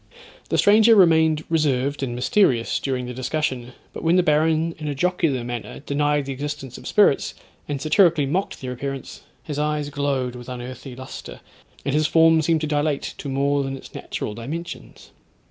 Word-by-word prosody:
The - - +1
stranger 220 +2 +6
remained 160 -5 +4
reserved 145 -4 0
and 125 -3 -2
mysterious 125 - +2
during 130 -2 -2
the 125 - -6
discussion, 130 -1 -2 0.2
but - - -7
when 165 +2 +3
the 180 - +4
baron 160 +1 +2
in 150 - -5
a 145 - -2
jocular 160 -5 0
manner 120 +2 -6
denied 145 0 0
the 135 - -4
existence 145 -1 -5
of - - -10
spirits, - - +3 0.3
and 145 -1 -2
satirically 160 0 +3
mocked 180 +8 -2
their 130 -1 -4
appearance, 135 +2 -6 0.2
his 150 -2 -4
eyes 150 -1 -1
glowed 140 -3 -1
with 125 +1 -9
unearthly 125 +1 -7
lustre, 130 +1 -9 0.5
and 140 - 0
his 155 +1 +2
form 160 -1 +5
seemed 160 0 +1
to 155 - -1
dilate 150 -1 -1
to 140 - -5
more 140 +1 +1
than 135 0 -4
its - - -13
natural 105 - -5
dimensions. 155 +10 -7
145 Hz, 175 wpm, -23 LUFS, 130-160 Hz, 0.5 s, stranger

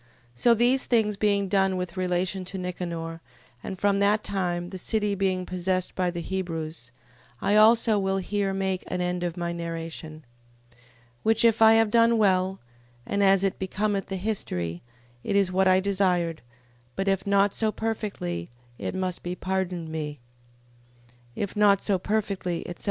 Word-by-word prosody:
So 235 - +4
these 245 +4 +2
things 220 -4 +2
being 200 -1 +1
done 190 -1 +2
with 180 -1 -4
relation 185 +1 -1
to 185 +2 -6
Nicanor, 170 -2 -5 0.4
and 190 - -6
from 200 +1 +2
that 205 +1 +3
time 175 -2 -2
the 190 - -6
city 210 +1 0
being 190 -2 0
possessed 185 0 -1
by 180 -1 0
the 175 -1 -4
Hebrews, 165 -8 -4 0.5
I 205 - +1
also 220 0 +5
will 195 0 0
here 195 +1 -1
make 190 -1 -2
an 180 - -3
end 180 0 -1
of 175 0 -3
my 170 0 -2
narration. 165 -2 -6 0.5
15:39. 120 - -25 0.4
Which 225 +1 +3
if 230 -1 +3
I 220 0 +8
have 225 -1 +4
done 230 0 +4
well, 190 -2 +2 0.5
and 200 0 0
as 195 -1 +4
it 195 - 0
becometh 195 +1 -1
the 195 - -3
history, 90 - -3 0.4
it - - -1
is 195 -2 +3
what 190 +1 +2
I 185 0 +5
desired: 185 -4 0 0.5
but 195 - -2
if 195 0 0
not 200 0 +3
so 220 -1 +1
perfectly, 205 - -4 0.3
it - - -4
must 185 -2 -2
be 175 +1 -4
pardoned 185 -3 -3
me. 150 -2 -5 1.2
If 200 - -3
not 205 -2 +5
so 195 -2 0
perfectly, 195 -4 -2
etc... 175 - -7
190 Hz, 165 wpm, -26 LUFS, 175-205 Hz, 1.2 s, I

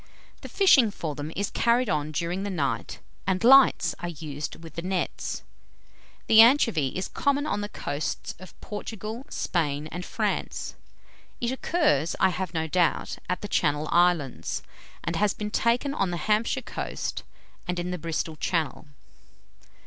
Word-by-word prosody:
The - - -8
fishing 290 - +5
for 165 -6 -4
them 145 +2 -6
is 200 +1 -2
carried 235 +1 +2
on 150 -4 -1
during 170 +5 -2
the 200 - -3
night, 140 - -2 0.3
and 190 +2 +1
lights 255 - +6
are 175 - -4
used 150 -3 -6
with 165 - -10
the 170 - -4
nets. 185 +1 -3 0.8
The 220 0 +8
anchovy 230 - +5
is 185 - -2
common 285 0 0
on 205 -9 -1
the 205 - -4
coasts 145 -5 -4
of 185 - -13
Portugal, 220 +3 -6
Spain, 150 -4 -1
and 180 +1 -5
France. - - -2 0.7
It 240 0 -1
occurs, 260 - +1
I 190 - +5
have 185 -1 -3
no 160 -2 -1
doubt, 170 0 0
at 180 0 -1
the 205 - -4
Channel 150 -5 +1
Islands, 175 -6 +1 0.4
and 165 - -2
has 205 +1 +2
been 210 0 -4
taken 240 +6 +1
on 195 -9 0
the 175 - -2
Hampshire 215 - +1
coast, - - -4 0.5
and 180 0 -2
in 175 +1 -2
the 180 - -3
Bristol 160 0 -3
Channel." 160 -2 -1
180 Hz, 155 wpm, -26 LUFS, 160-220 Hz, 0.8 s, The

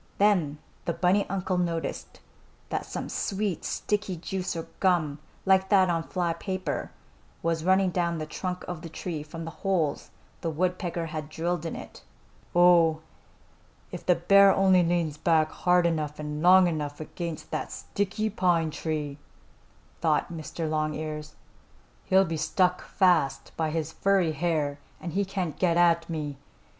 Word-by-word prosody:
Then 180 -8 +3 0.3
the 170 - 0
bunny 185 +4 +2
uncle 185 -1 -1
noticed 170 -2 -3 0.5
that - - -3
some - - -4
sweet, 200 -3 -2
sticky 205 -3 -1
juice 185 +2 -3
or 165 - -4
gum, 160 -6 +2 0.3
like 190 0 +4
that 190 -3 +5
on 165 -1 0
fly 170 0 -1
paper, 185 +2 -3 0.5
was 165 -1 0
running 190 +1 +3
down 170 -1 0
the 155 - -3
trunk 180 +3 -4
of 175 -3 -5
the 165 - -7
tree 160 0 -5
from 160 +2 -7
the 165 - -6
holes 170 -7 0 0.3
the 165 - -1
woodpecker 175 +1 -1
had 155 -2 -5
drilled 170 +1 -2
in - - -5
it. - - -10 0.5
"Oh, 170 -3 +5 0.9
if - - -7
the 180 - +4
bear 195 +4 +6
only 190 -2 +4
leans 170 -3 0
back 160 -1 +3
hard 180 -1 +3
enough 155 -3 -1
and 150 0 -4
long 185 +2 +7
enough 150 -3 -3
against 165 +1 -6
that - - -3
sticky 210 +2 -2
pine 175 -5 +2
tree," 150 -3 -3 0.8
thought - - +1
Mr. 160 0 -4
Longears, 155 0 -3 0.7
"he'll 190 +1 +4
be 165 -2 -3
stuck 180 +3 +1
fast 175 -8 +2
by 160 -1 0
his 160 0 -2
furry 195 -4 +2
hair 155 -3 -1 0.2
and 170 - -6
he 200 +2 +2
can't 185 -5 -3
get 170 -1 +3
me. 150 -4 -4
170 Hz, 150 wpm, -27 LUFS, 155-185 Hz, 0.9 s, long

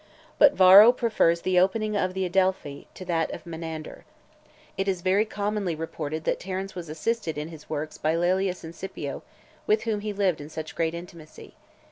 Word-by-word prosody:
But 290 -1 +7
Varro 195 +5 +9
prefers 215 -9 +1
the 185 -1 +2
opening 215 +3 +1
of 185 -2 -1
The 190 0 -1
Adelphi 185 -6 -1
to 185 - -9
that 165 -2 0
of 165 - -8
Menander. 160 -2 -7 0.7
It 195 - -2
is 185 -3 -1
very 195 +3 +3
commonly 205 -4 -2
reported 155 -1 -5
that - - -1
Terence 190 +1 -5
was 175 -3 -7
assisted 160 +1 -2
in 150 +2 -4
his 155 -3 -13
works 155 0 -4
by 155 +1 +1
Laelius 185 +2 0
and 165 0 -8
Scipio, 190 +3 -6 0.5
with 430 +1 +2
whom 220 -3 -1
he 210 +1 -4
lived 195 -6 0
in 145 - -9
such 155 0 -7
great 165 0 -1
intimacy. 170 -2 -11
180 Hz, 180 wpm, -26 LUFS, 160-195 Hz, 0.7 s, Varro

